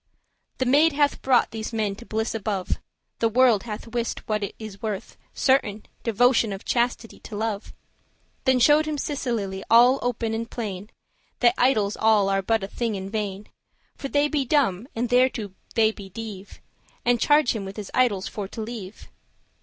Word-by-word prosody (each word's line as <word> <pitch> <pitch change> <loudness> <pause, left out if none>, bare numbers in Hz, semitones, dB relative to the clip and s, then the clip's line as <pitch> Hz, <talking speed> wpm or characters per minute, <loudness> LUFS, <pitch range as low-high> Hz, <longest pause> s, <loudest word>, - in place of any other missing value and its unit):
"The 260 - 0
maid 295 +5 +4
hath 290 0 +1
brought 260 -2 +3
these 220 0 -5
men 215 -3 -1
to 235 - -12
bliss 220 +1 -2
above; 205 -4 -2 0.4
The 230 - +2
world 235 -3 +4
hath 215 -2 -6
wist 235 0 -3
what 215 -1 0
it 200 - -4
is 215 -3 -9
worth, 210 -3 -4 0.2
certain, 220 -6 +1 0.2
Devotion 230 0 +3
of 195 0 -7
chastity 240 -1 -1
to 215 - -9
love."] 215 -1 -2
<10> - - -14 0.7
Then 260 -1 +4
showed 295 +5 +5
him 305 -1 -2
Cecilie 230 -10 -3
all 245 +3 +6
open 235 -2 -1
and 230 +1 -3
plain, 205 -3 -5 0.5
That 240 -1 +5
idols 215 -6 +2
all 215 -3 +3
are 195 0 +1
but 220 +1 0
a - - -3
thing 230 +1 -2
in 190 0 -6
vain, 205 -2 -3 0.5
For 275 - -5
they 290 +1 +2
be 295 -2 0
dumb, 245 -7 +1
and 235 +2 0
thereto* 245 -5 +2 0.2
they 220 -1 +4
be 200 -3 -11
deave; 205 -1 -7
*therefore - - -16 0.3
deaf - - -35
And 240 0 +3
charged 295 -3 +4
him 200 -3 -4
his 205 0 -8
idols 225 -7 +2
for 205 -2 -5
to 215 - -9
leave. 220 -3 -7
225 Hz, 185 wpm, -24 LUFS, 205-245 Hz, 0.7 s, all